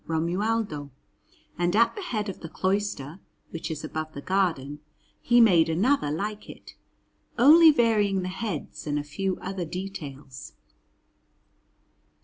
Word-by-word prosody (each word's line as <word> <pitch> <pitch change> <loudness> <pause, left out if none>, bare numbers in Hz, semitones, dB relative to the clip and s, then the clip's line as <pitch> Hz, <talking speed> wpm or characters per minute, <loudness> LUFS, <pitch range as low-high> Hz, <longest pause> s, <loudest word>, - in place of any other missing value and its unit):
Romualdo; 170 -1 -1 0.7
and 175 +2 +1
at 230 +2 +4
the 415 - -6
head 220 - -3
of 195 - -6
the 165 - -8
cloister, 190 -6 -2 0.3
which 165 0 -5
is 155 -2 -5
above 155 0 -5
the 140 - -6
garden, 160 -7 -1 0.4
he 240 0 +4
made 175 -8 +5
another 195 - +1
like 205 +8 -4
it, - - -12 0.6
only 315 +7 +8
varying 210 -8 +2
the - - -3
heads 185 -6 -5
and 145 0 -1
a 145 - -2
few 185 +6 -3
other 190 -1 -4
details. 150 -7 -8
185 Hz, 130 wpm, -26 LUFS, 155-210 Hz, 0.7 s, only